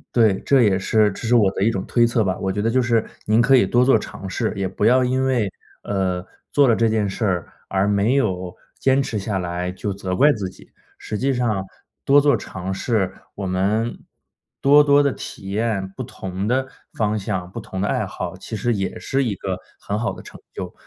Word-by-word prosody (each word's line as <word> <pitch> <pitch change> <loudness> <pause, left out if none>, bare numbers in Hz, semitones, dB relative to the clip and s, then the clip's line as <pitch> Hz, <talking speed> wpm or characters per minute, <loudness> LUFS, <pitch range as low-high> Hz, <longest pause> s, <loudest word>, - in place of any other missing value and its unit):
对， 110 -5 +4
这 135 -2 +5
也 100 -3 +3
是 105 +2 +3
这 115 - -6
是 120 - +4
我 105 -5 +4
的 - - -5
一 105 - +4
种 95 -4 -3
推 120 -1 +3
测 115 -1 +1
吧， 95 -2 -1
我 95 - -2
觉 100 +2 -1
得 115 +2 +1
就 130 +2 +3
是 115 -2 +1 0.2
您 110 +2 +4
可 130 +3 +4
以 125 -6 +6
多 120 +5 +3
做 125 -4 +4
尝 95 -2 -8
试， 90 - -1
也 100 - -2
不 100 - -2
要 125 +3 +5
因 130 +1 +1
为， 120 -7 +1 0.3
呃， 95 -2 -1 0.3
做 140 -3 +5
了 - - +5
这 115 +1 +2
件 110 -2 +1
事 110 +4 -2
儿， 90 -4 -1 0.2
而 95 0 +1
没 105 +5 +2
有 95 -9 -1 0.2
坚 135 +1 +3
持 110 -5 -3
下 95 -1 -2
来 90 0 -3
就 100 +2 -3
责 95 -1 -3
怪 145 +8 +5
自 100 -7 -3
己， - - -18 0.3
实 105 - -5
际 135 +5 +1
上 110 -6 0 0.4
多 145 +1 +6
做 145 0 +3
尝 95 0 -5
试 95 -2 0 0.2
我 100 - -4
们 100 +5 -1 0.6
多 145 +2 +7
多 145 0 +5
地 140 - +2
体 95 - -8
验 100 -2 -1
不 95 - -9
同 95 +1 -5
的 130 +3 +1 0.3
方 110 -1 0
向、 90 -2 -4
不 - - -6
同 95 0 -6
的 105 - 0
爱 - - 0
好， - - -6
其 - - -7
实 120 +3 0
也 95 -3 -3
是 135 - -1
一 110 -4 -1
个 95 -1 -4 0.2
很 105 +1 -3
好 115 - -1
的 - - -11
成 - - -12
就。 - - -6
105 Hz, 240 characters per minute, -21 LUFS, 95-120 Hz, 0.6 s, 多